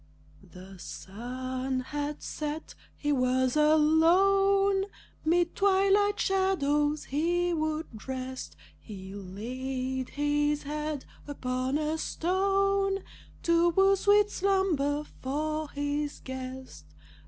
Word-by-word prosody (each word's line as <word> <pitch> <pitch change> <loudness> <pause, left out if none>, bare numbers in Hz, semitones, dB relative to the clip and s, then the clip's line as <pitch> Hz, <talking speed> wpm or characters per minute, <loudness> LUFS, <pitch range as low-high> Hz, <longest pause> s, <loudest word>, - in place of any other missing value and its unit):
The 185 +1 -12
sun 255 +7 -4
had 290 +2 -4
set. 305 +1 -5 0.2
He 295 - -1
was 255 -1 +2
alone; 385 +6 +4 0.4
Mid 340 +2 +2
twilight 395 +1 +3
shadows 300 -6 +1
he 345 +5 0
would 310 -8 -3
rest. 260 0 -5 0.2
He 190 -3 -9
laid 255 +7 -4
his 295 0 0
head 300 -1 -4 0.2
upon 255 -1 -2
a 310 +1 -1
stone 390 +3 +1 0.4
To 335 0 +4
woo 385 +3 +4
sweet 410 +1 +4
slumber 340 -7 +1 0.2
for 305 +3 -2
his 290 0 -2
guest. 260 - -8
295 Hz, 95 wpm, -29 LUFS, 260-355 Hz, 0.4 s, alone